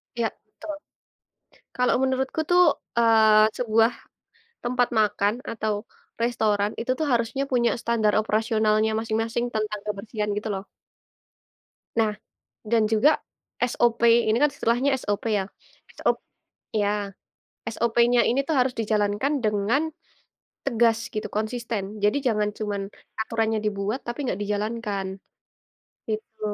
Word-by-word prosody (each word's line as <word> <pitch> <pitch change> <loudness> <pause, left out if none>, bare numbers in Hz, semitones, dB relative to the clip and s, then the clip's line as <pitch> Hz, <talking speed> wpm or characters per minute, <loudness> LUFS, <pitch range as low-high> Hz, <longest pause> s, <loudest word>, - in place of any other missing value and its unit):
Iya 235 -1 +1 0.2
betul. 215 +9 -8 1.0
Kalau 250 0 +3
menurutku 265 +3 0
tuh, 355 0 +6 0.4
eee, 220 -2 +5
sebuah 225 -1 +3 0.7
tempat 245 0 +2
makan 210 -1 +2 0.2
atau 220 -2 -1 0.5
restoran 215 -3 +1
itu 235 - -3
tuh 315 - 0
harusnya 235 +2 0
punya 240 -2 +3
standar 230 -2 +1
operasionalnya 215 0 +2
masing-masing 225 +1 -1
tentang 215 -1 -2
kebersihan 210 +1 -3
gitu 210 +1 -3
loh. 195 +1 -6 1.3
Nah 225 -2 +3 0.5
dan 220 0 +2
juga 225 +8 +4 0.4
SOP 240 -1 +1
ini 230 -1 +4
kan 295 - +5
istilahnya 245 0 +1
SOP 205 -1 -1
ya. 200 - +1 0.6
SO - - +2 0.7
ya, 205 -1 0 0.7
SOP-nya 235 +1 +3
ini 270 +3 +1
tuh 320 - -1
harus 250 0 +2
dijalankan 215 +5 0
dengan 215 +9 +1 0.7
tegas 230 -3 +1
gitu, 215 - -3
konsisten. 215 -2 -3
Jadi 210 +7 +1
jangan 210 -3 +1
cuma 210 -2 -3 0.4
aturannya 220 0 0
dibuat 210 +4 -2
tapi 240 0 -4
nggak 195 - -1
dijalankan 210 -1 -2 1.0
gitu. 220 0 -5
220 Hz, 115 wpm, -25 LUFS, 210-240 Hz, 1.3 s, tuh